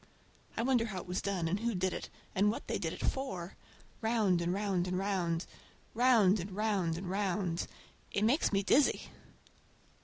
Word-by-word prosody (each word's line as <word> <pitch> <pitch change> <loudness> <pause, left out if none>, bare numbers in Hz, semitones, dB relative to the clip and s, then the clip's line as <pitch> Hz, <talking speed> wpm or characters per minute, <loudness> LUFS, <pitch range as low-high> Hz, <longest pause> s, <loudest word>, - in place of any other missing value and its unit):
I - - +1
wonder 245 -2 +3
how 205 -4 -5
it - - -12
was 180 +1 -2
done 190 -4 -1
and 190 +5 0
who 230 -1 -1
did 185 0 0
it, - - -5 0.2
and 200 +2 +3
what 215 - -3
they - - -1
did - - -2
it - - -4
for. 190 -10 -3 0.5
Round 220 -6 +2
and 170 +1 0
round 190 -2 0
and 180 0 -1
round—round 195 +4 +1
and 180 +3 -4
round 195 -5 0
and 180 +1 -5
round—it 190 0 -3
makes 255 +9 +3
me 200 -1 +2
dizzy! 275 +8 +3
195 Hz, 165 wpm, -33 LUFS, 180-220 Hz, 0.5 s, wonder